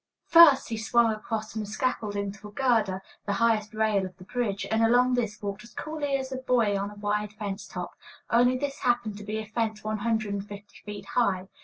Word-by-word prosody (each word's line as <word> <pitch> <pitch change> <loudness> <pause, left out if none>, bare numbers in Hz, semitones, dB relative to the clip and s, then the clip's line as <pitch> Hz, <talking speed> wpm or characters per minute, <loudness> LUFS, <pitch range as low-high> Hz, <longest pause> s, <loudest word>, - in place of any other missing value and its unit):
First 330 -8 +7
he 225 - -2
swung 225 +1 +3
across 215 0 -4
from 220 - -3
the 210 - -5
scaffolding 210 -3 -2
to 210 +1 -11
a - - -12
girder, 215 -6 +1 0.2
the 200 - +1
highest 220 -1 +1
rail 215 -2 +2
of 185 -1 -7
the 185 - -12
bridge, 200 -2 -2
and 220 0 +2
along 245 +2 +4
this 225 -4 -1
walked 200 +1 -4
as 235 - -16
coolly 300 -3 -2
as 265 0 -5
a 260 - -3
boy 245 -5 +2
on 200 +1 -2
a 210 - -12
wide 205 0 -2
fence 205 -1 -5
top, 180 -1 -6 0.4
only 245 +2 +4
this 280 +1 -3
happened 235 -4 0
to - - -8
be 210 +1 -3
a 220 - -4
fence 220 -1 -2
one 215 0 -2
hundred 220 -2 0
and 200 0 -4
fifty 205 0 -11
feet 205 -2 -7
high. 195 -4 0
215 Hz, 220 wpm, -27 LUFS, 205-240 Hz, 0.4 s, First